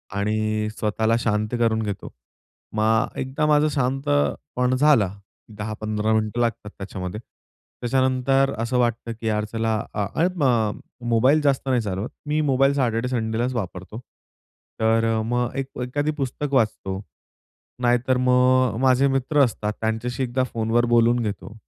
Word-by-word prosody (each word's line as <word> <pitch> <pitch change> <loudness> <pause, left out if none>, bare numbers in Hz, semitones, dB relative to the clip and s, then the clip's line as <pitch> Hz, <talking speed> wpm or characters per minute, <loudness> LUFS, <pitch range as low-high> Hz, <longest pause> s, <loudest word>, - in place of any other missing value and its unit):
आणि 110 +1 0
स्वतःला 110 +2 +1
शांत 110 0 0
करून 110 -1 +2
घेतो. 100 -2 -5 0.6
मग 110 +1 +1
एकदा 130 +3 -1
माझं 150 0 +4
शांत 135 +1 -1 0.5
मन 125 0 +2
झालं, 130 -9 +4 0.5
10-15 110 0 -2
मिनिटं 110 +1 0
लागतात 115 -3 -1
त्याच्यामध्ये. 95 0 -6 0.6
त्याच्यानंतर 130 +2 +2
असं 115 +2 -1
वाटतं 120 -1 0
की 115 - -3
यार 105 -1 0
चला 115 0 0 0.2
अ, 105 -1 -1 0.2
ऐ 175 - +5
म 120 - +1 0.3
मोबाईल 130 +7 +4
जास्त 140 -2 +1
नाही 125 -2 +2
चालवत. 100 +2 -3 0.2
मी 150 +1 0
मोबाईल 135 +1 +3
सॅटर्डे 125 -3 0
संडेलाच 120 0 -1
वापरतो. 95 0 -5 0.8
तर 115 0 +3 0.2
मग 120 +1 -1
एक 135 -1 -2
एखादं 145 +5 -1
पुस्तक 140 +1 -3
वाचतो. 105 -6 0 0.8
नाहीतर 125 +1 +2
मग 125 -1 +3
माझे 130 +1 +4
मित्र 135 +2 0
असतात, 105 -3 -1
त्यांच्याशी 115 +3 -2
एकदा 130 +1 0
फोनवर 115 0 0
बोलून 120 +1 +4
घेतो. 105 +1 -5
120 Hz, 135 wpm, -23 LUFS, 110-130 Hz, 0.8 s, ऐ